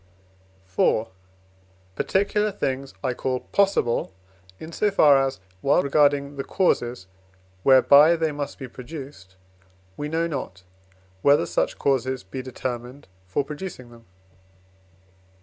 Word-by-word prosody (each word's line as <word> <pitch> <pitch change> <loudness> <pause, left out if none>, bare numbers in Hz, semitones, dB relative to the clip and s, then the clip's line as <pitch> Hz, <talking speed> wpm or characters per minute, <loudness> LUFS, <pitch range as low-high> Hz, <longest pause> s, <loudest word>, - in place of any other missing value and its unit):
IV. 110 -1 +2 0.9
Particular 210 - 0
things 135 -8 -3
I 130 -2 0
call 130 0 -2
possible 195 - +1 0.5
in 160 - -9
so 210 +5 +1
far 150 -8 +5
as, 135 -5 -3 0.2
while 140 0 +3
regarding 140 0 +2
the 135 - -2
causes 120 - 0 0.6
whereby 140 - +6
they 160 -2 0
must 145 -1 -5
be 135 - -7
produced, 125 - -10 0.6
we 145 0 -4
know 165 +2 0
not, 130 - -5 0.6
whether 145 +5 +4
such - - -1
causes 130 -2 0
be 110 +8 -7
determined 125 0 -6 0.2
for 95 +10 -1
producing 150 -4 -8
them. 115 -1 -17
140 Hz, 115 wpm, -24 LUFS, 125-155 Hz, 0.9 s, whereby